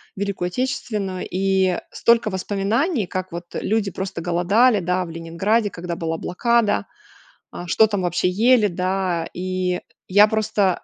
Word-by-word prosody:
Великую 195 -2 -2
Отечественную. 200 -3 -3
И 190 -1 +1
столько 235 -2 +3
воспоминаний, 205 - -1
как 185 0 -4
вот 170 +1 -6
люди 210 -2 0
просто 190 -1 -5
голодали, 200 +7 +3
да, 180 +1 0
в - - -10
Ленинграде, 170 +7 0
когда 175 -2 -5
была 165 -1 -3
блокада, 220 - +1 0.7
а, 175 - -8
что 220 +6 +4
там 205 -2 -2
вообще 175 +1 +1
ели, 220 +3 +4
да. 180 -2 -1
И 185 0 -2 0.3
я 205 +3 +6
просто 210 -4 0
190 Hz, 140 wpm, -22 LUFS, 180-215 Hz, 0.7 s, я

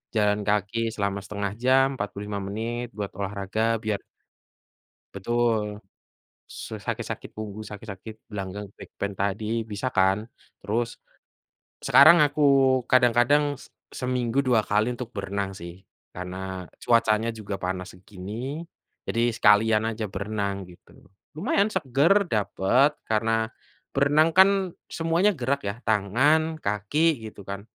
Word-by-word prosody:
jalan 105 -1 +2
kaki 105 +1 0 0.2
selama 100 -2 -1
setengah 100 -1 -3
jam, 130 +1 +5
45 105 0 -4
menit 115 +4 -3
buat 100 -2 -4
olahraga 100 +1 -3 0.2
biar 105 -2 -1 1.2
Betul, 110 0 0 0.7
su - - -8
sakit-sakit - - -5
punggung, 110 -1 -6
sakit-sakit 105 0 -9 0.2
gelanggang 100 0 -6
back - - -12
pain 100 0 -3
tadi, 100 +2 -2 0.2
bisa 110 +5 -3
kan. 95 +2 +2 0.4
Terus, 115 +3 -1 0.9
sekarang 155 +5 +8
aku 145 +1 -2 0.5
kadang-kadang 125 +3 +4 0.2
se - - -15 0.2
seminggu 125 0 0
2 125 -4 +3
kali 105 +2 +2
untuk 125 -2 -7
berenang 100 0 -3
sih, 90 +1 -10 0.3
karena 95 0 -6 0.2
cuacanya 115 -1 +3
juga 105 -3 -6
panas 90 0 -3
segini, 105 - -7 0.4
jadi 115 +1 +1
sekalian 110 0 +4
aja 110 0 -3
berenang 100 -1 -3
gitu. 90 0 -18 0.5
Lumayan 200 +4 +1
seger 170 - +3
dapet, 110 - +2 0.2
karena 110 +1 +1 0.5
berenang 145 +3 +4
kan 190 +1 +9 0.5
semuanya 165 +5 +2
gerak 135 +3 0
ya, - - -2
tangan, 135 +10 +2
kaki 105 +7 -1 0.3
gitu 105 - -13
kan, 100 0 -4
110 Hz, 120 wpm, -25 LUFS, 100-125 Hz, 1.2 s, kan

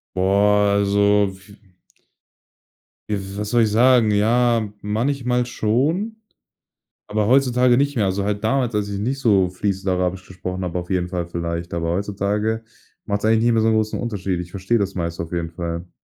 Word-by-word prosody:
Boah, 100 +2 +3
also, 100 0 +3
w 95 +1 -16 1.6
w 100 -1 -4
was 105 0 -3
soll 120 -1 +3
ich 110 - +2
sagen? 120 -1 +4
Ja, 115 +1 +2
manchmal 125 +3 0
schon, 140 - 0 0.9
aber 105 0 0
heutzutage 125 -1 +4
nicht 140 +1 +1
mehr. 110 -5 +1
Also 95 +1 -1
halt 105 +1 -2
damals, 120 0 +1
als 105 -1 -1
ich 100 -1 -4
nicht 130 +6 -2
so 100 -8 +3
fließend 95 +1 -3
Arabisch 90 +1 -1
gesprochen 90 0 -5
habe, 90 0 -2
auf 90 - -8
jeden 90 -1 -1
Fall 90 -1 -3
vielleicht. 85 0 -4
Aber 85 -1 -2
heutzutage 105 +4 -1 0.4
macht's 100 0 -2
eigentlich 110 +1 +3
nicht 120 - +3
mehr 115 - +3
so 110 - +2
'n 110 - +3
großen 110 0 0
Unterschied. 100 -6 -2
Ich 90 0 -7
verstehe 100 +5 0
das 100 -1 -2
meiste 85 -1 -3
auf 85 - -10
jeden 85 -1 -2
Fall. 85 +1 -5
105 Hz, 175 wpm, -21 LUFS, 95-115 Hz, 1.6 s, sagen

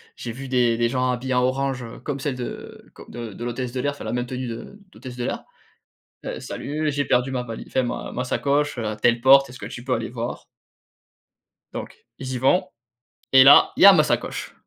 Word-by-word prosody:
j'ai 120 - -6
vu 135 +4 -8
des 120 -3 +2
des 120 0 +1
gens 125 0 0
habillés 125 +1 -2
en 125 - +3
orange, 130 0 -1
heu, 115 - -9
comme 140 +2 -4
celle 135 -1 -2
de 125 - -8
co - - -12
de 115 -3 -7
de 120 +5 -7
l'hôtesse 120 0 -4
de 130 - -3
l'air, 145 - 0
enfin 140 - -10
la - - -4
même 125 0 -1
tenue 125 0 -5
de 120 - -8
d'hôtesse 125 -1 -10
de 120 - -3
l'air. - - -3 0.8
«Heu, - - -5
salut, 150 +1 -3
j'ai 145 0 -1
perdu 125 +2 +1
ma 125 -2 -2
vali 115 -2 -7
enfin 130 - 0
ma 120 - -4
ma 125 - -3
sacoche, 140 +1 0
heu, 115 - -2
à 105 0 -3
telle 120 +2 +2
porte, 135 +1 +6
est-ce 125 - -11
que - - -7
tu 120 - -8
peux 130 - -2
aller 115 0 -3
voir?» 120 0 -5 1.3
Donc - - -7 0.2
ils 130 -1 -5
y 125 - -2
vont 180 +9 +2 0.7
et 130 0 +9
là, 140 +2 +8
il - - +2
y - - +11
a 200 - +11
ma 155 -5 +5
sacoche! - - -2
125 Hz, 235 wpm, -23 LUFS, 120-135 Hz, 1.3 s, y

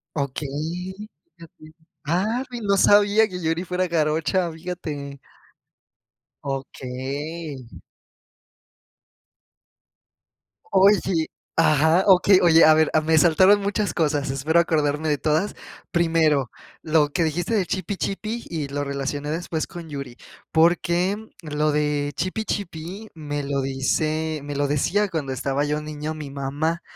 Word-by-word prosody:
Okey, 155 +6 -4 0.4
fíjate. 155 -1 -15 0.3
Ah, 205 - 0
y 240 -1 -5
no 200 -2 +2
sabía 205 +2 +5
que 180 -2 -6
Yuri 165 +1 -1
fuera 180 +1 -1
jarocha, 165 +2 0
fíjate. 160 -5 -6 1.2
Okey. 135 +2 -5 3.0
Uy, 195 +2 +5
sí, 165 -4 0 0.3
ajá, 160 +2 +4
okey. 190 0 +6
Oye, 165 -1 +6
a 155 - +7
ver, 155 0 +3
a 155 - +4
me 160 +1 +2
saltaron 185 +6 +5
muchas 205 0 -1
cosas, 150 -3 0
espero 150 +5 +2
acordarme 155 -2 +1
de 145 - +1
todas. 155 +8 0 0.4
Primero, 165 -6 +2 0.3
lo 155 -2 +2
que 170 +4 0
dijiste 170 +6 -1
de 195 -4 +1
chipi 190 +2 -3
chipi, 215 +5 -4
y 155 -4 -3
lo 145 +1 -2
relacioné 140 +1 -3
después 165 -1 -3
con 170 -2 -9
Yuri, 140 -4 -7 0.3
porque 175 +3 +2 0.3
lo 150 0 0
de 150 -1 0
chipi 185 +7 -2
chipi 190 +3 -5
me 145 -2 -4
lo 140 0 -1
dice 155 +4 -1
me 145 0 -5
lo 145 0 +1
decía 175 +9 +1
cuando 150 -7 -3
estaba 135 +2 -1
yo 150 +1 -1
niño 150 0 -5
mi 150 -3 -7
mamá, 145 +5 -2
160 Hz, 130 wpm, -23 LUFS, 145-180 Hz, 3.0 s, a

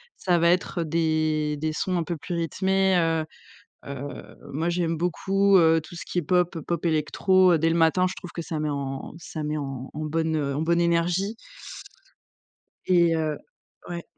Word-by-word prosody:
ça 180 -2 +1
va 170 +1 +4
être 175 -1 +1
des 155 -2 0
des 155 +1 -2
sons 180 +3 -1
un 170 - 0
peu 170 +1 -3
plus 175 +3 -5
rythmés, 190 +3 +1
heu 165 -2 +1 0.6
heu, 140 0 -8
moi 160 +5 -1
j'aime 170 -1 0
beaucoup, 195 +3 +2
heu, 165 -1 +5
tout 165 +3 -12
ce - - -6
qui 180 - 0
est - - -2
pop, 180 0 +1
pop-électro, 170 +3 +2
heu, 165 - +4
dès 165 - +2
le 165 - +1
matin, 170 +2 +3
je - - -5
trouve 180 - -9
que 170 - -4
ça 160 -2 -4
met 150 - -1
en 135 -1 -4
ça 160 -2 -6
met 150 +1 -2
en 135 -2 -5
en 155 +1 -4
bonne, 160 +1 -1
heu, 140 -3 -1
en 150 - -1
bonne 170 +1 +2
énergie 170 +5 +1 1.5
et 170 -2 +4
heu 155 -2 -1 0.5
ouais. 170 -1 -5
165 Hz, 185 wpm, -25 LUFS, 155-175 Hz, 1.5 s, heu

